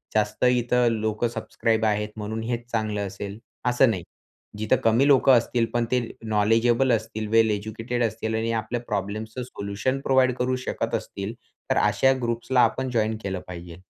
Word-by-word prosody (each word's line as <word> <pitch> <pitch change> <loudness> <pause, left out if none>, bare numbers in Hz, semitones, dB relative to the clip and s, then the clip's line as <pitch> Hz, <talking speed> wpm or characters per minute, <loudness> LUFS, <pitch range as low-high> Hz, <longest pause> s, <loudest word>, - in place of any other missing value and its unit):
जास्त 105 +2 0
इथे 125 0 +3
लोक 110 +1 0
सबस्क्राईब 115 -1 -1
आहेत 105 0 0
म्हणून 110 +1 -4
हेच 120 0 -3
चांगलं 105 -3 -1
असेल, 100 +1 -7 0.3
असं 125 +1 +4
नाही. 95 -6 -2 0.5
जिथे 110 0 +2
कमी 115 +5 +4
लोक 135 -2 +5
असतील 120 -1 +4
पण 120 -1 +1
ते 125 - +3 0.2
नॉलेजेबल 115 +4 +2
असतील, 110 -1 -2
वेल 115 0 +4
एज्युकेटेड 110 +4 -2
असतील 110 0 -2
आणि 115 +1 -1
आपल्या 120 +2 -4
प्रॉब्लेम्सचं 110 +5 -3
सोल्युशन 105 +3 -3
प्रोव्हाइड 130 -2 +3
करू 125 +1 0
शकत - - -2
असतील, 100 +3 -5 0.4
तर - - +2
अशा 135 0 +3
ग्रुप्सला 120 +2 +1
आपण 130 0 +1
जॉइन 110 -2 0
केलं 95 -2 -3
पाहिजे. 85 -1 -8
115 Hz, 160 wpm, -25 LUFS, 105-120 Hz, 0.5 s, लोक